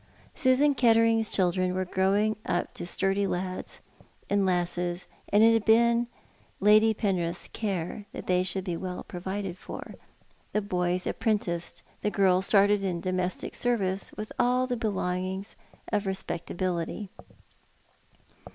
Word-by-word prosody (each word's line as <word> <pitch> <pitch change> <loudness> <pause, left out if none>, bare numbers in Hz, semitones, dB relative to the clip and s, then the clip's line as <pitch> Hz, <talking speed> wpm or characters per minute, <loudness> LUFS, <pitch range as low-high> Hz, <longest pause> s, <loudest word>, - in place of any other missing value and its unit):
Susan 270 +3 +3
Kettering's 230 -3 +3
children 185 0 +1
were 185 0 0
growing 195 +4 +2
up 175 - -1
into - - -6
sturdy 195 +2 +1
lads 185 0 -4 0.5
and 200 -1 +3
lasses, 175 0 -1 0.2
and 205 +2 +5
it 230 0 +7
had 225 -2 +2
been 235 +2 +4 0.5
Lady 215 +2 +6
Penrith's 180 -5 -1
care 200 -1 -3
that - - -7
they 180 0 +2
should 185 +1 -1
be 180 -3 -3
well 180 +1 -5
provided 190 0 -5
for, - - -8 0.6
the 210 - +2
boys 180 -2 -1
apprenticed, 185 -6 -2 0.2
the 210 - +1
girls 190 -2 +3
started 205 0 +4
in 180 -3 -1
domestic 185 0 -2
service 200 -6 0
with 215 - -6
all 250 +1 +3
the 250 -1 -2
belongings 190 -3 -2 0.4
of 205 -1 0
respecta 190 -3 -3
bility. 185 +2 -2
195 Hz, 135 wpm, -28 LUFS, 180-215 Hz, 0.6 s, it